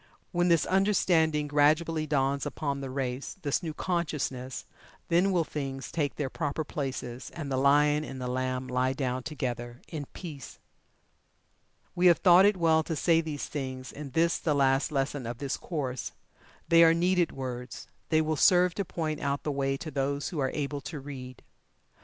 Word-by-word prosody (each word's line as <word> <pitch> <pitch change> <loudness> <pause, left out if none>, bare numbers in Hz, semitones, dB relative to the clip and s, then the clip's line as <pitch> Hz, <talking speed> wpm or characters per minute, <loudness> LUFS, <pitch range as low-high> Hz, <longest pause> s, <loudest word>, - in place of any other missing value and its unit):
When 175 -1 +2
this 170 -3 +4
understanding 175 -6 +2
gradually 155 +2 +2
dawns 140 -1 +1
upon 140 -2 -3
the 135 - -5
race 130 0 -3
this 145 -2 0
new 165 -3 -4
consciousness 150 -8 -2 0.4
then 180 +4 +3
will 175 -3 +2
Things 135 -3 -5
take 150 -4 -1
their 145 - -2
proper 145 +2 -2
places, 130 -4 -5
and 150 -5 -5
the 130 - 0
Lion 145 +2 +4
and 135 -3 -7
the 125 - -4
Lamb 130 0 -2
lie 130 +1 +1
down 130 -2 -2
together 120 -4 -4
in 150 -4 -6
peace. 150 -8 -8 1.4
We 180 +1 +4
have 170 - +6
thought 185 +1 +7
it 205 -2 +2
well 160 -2 +4
to 160 +1 -3
say 165 +1 +3
these 155 -3 -4
things 130 -3 -5
in 145 -1 -8
this 165 +5 +2
the 150 -3 0
last 135 +2 +2
lesson 135 -2 -1
of 120 0 -5
this 140 0 -2
course. 130 -7 -4 0.5
They 165 0 +7
are 165 0 +6
needed 175 0 +2
words 125 -2 -6 0.2
they 155 -1 +4
will 155 0 0
serve 180 +3 +5
to 200 - -2
point 160 -4 -3
out 140 0 -2
the 150 - -1
way 135 -1 0
to 155 +2 -7
those 140 +1 -1
who 165 - -4
are 135 -1 +1
able 145 -1 -2
to 150 +1 -6
read. 130 -3 -9
145 Hz, 175 wpm, -29 LUFS, 135-165 Hz, 1.4 s, thought